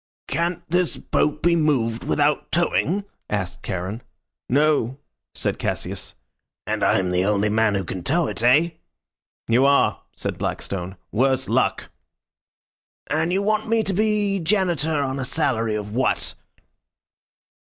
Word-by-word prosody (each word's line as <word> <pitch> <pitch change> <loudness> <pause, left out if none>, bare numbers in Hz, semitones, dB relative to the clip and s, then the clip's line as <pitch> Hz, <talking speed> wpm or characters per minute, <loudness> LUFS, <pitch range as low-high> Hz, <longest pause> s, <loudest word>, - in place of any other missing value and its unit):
"Can't 170 +1 -1
this 180 +1 +1
boat 150 0 0
be 170 0 +4
moved 130 -8 +1
without 145 0 +1
towing?" 175 +3 +1 0.3
asked 95 -3 -3
Charon. 95 +5 -4 0.5
"No," 140 -2 +2 0.4
said - - -2
Cassius. - - -4 0.5
"And - - -1
I'm 90 -1 +2
the 90 0 +2
only 105 +1 +2
man 110 -1 +2
who 95 - 0
can 95 +1 -5
tow 165 - +1
it, - - -3
eh?" 145 +8 +4 0.8
"You 120 +3 +4
are," 140 0 +3
said - - -4
Blackstone. 95 0 -3
"Worse 130 +4 +1
luck." - - 0 1.2
"And 160 +3 +1
you 195 +2 +1
want 215 +1 0
me 225 -1 +3
to 195 - -1
be 205 -1 +1
Janitor 175 -3 +1
on 135 -1 -1
a - - -1
salary 125 -6 0
of 105 0 -5
what?" 130 +2 0
140 Hz, 135 wpm, -23 LUFS, 110-170 Hz, 1.2 s, be